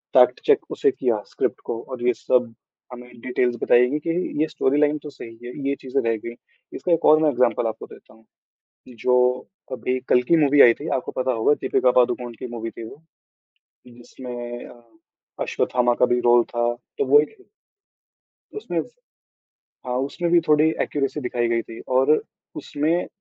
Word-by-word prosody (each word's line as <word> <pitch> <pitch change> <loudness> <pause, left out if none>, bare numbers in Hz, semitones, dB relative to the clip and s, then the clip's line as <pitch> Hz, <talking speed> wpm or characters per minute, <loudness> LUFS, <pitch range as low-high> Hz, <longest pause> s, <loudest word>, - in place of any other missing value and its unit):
Fact-check 440 -3 +4
उसे 415 - +1
किया, 115 - -1
script - - -2
को 115 - -4
और 125 -1 -6
ये 125 - +4
सब 125 -2 0 0.4
हमें 125 0 -11
डिटेल्स 125 -1 0
बताई 125 +1 +4
गई 150 +2 -1
कि - - +1 0.3
ये 155 - +2
स्टोरीलाइन 150 +1 +1
तो 150 - -7
सही 115 -4 -11
है, 120 - -6 0.2
ये 140 - 0
चीज़ें 135 +1 -1
रह 115 0 +1
गई। 115 0 -6 0.4
इसका 180 - -3
एक 165 - 0
और 155 +1 +6
मैं 155 - +4
एग्ज़ाम्पल 120 -3 +1
आपको 110 - -6
देता - - -16
हूँ, 110 0 -23 0.6
जो 125 +1 +2 0.3
अभी 130 0 -2
कल्कि 125 +7 +3
मूवी 145 -2 +5
आई 120 - +8
थी, 150 - -9
आपको 130 - -2
पता 130 - 0
होगा 115 +5 +2
दीपिका 125 - +2
पादुकोण 120 0 0
की - - -6
मूवी 115 -1 -5
थी - - -9
वो, 155 - -15 0.9
जिसमें 120 0 -9
अ, 120 - -16 0.6
अश्वत्थामा 120 -1 0
का 125 - +6
भी 125 0 +1
रोल 120 0 +4
था, 120 0 -1 0.2
तो - - 0
वो 145 +3 +7
एक 150 - -5
ही 385 - -21 1.1
उसमें 425 - -3
स - - -9 1.0
हाँ, 125 - -2
उसमें 140 +6 -2
भी 175 - +6
थोड़ी 155 +1 +4
एक्यूरेसी 145 +1 -2
दिखाई 120 -2 -1
गई 115 0 0
थी 115 - -11 0.2
और 135 +2 +3 0.5
उसमें 160 +5 -1
125 Hz, 175 wpm, -22 LUFS, 120-145 Hz, 1.1 s, आई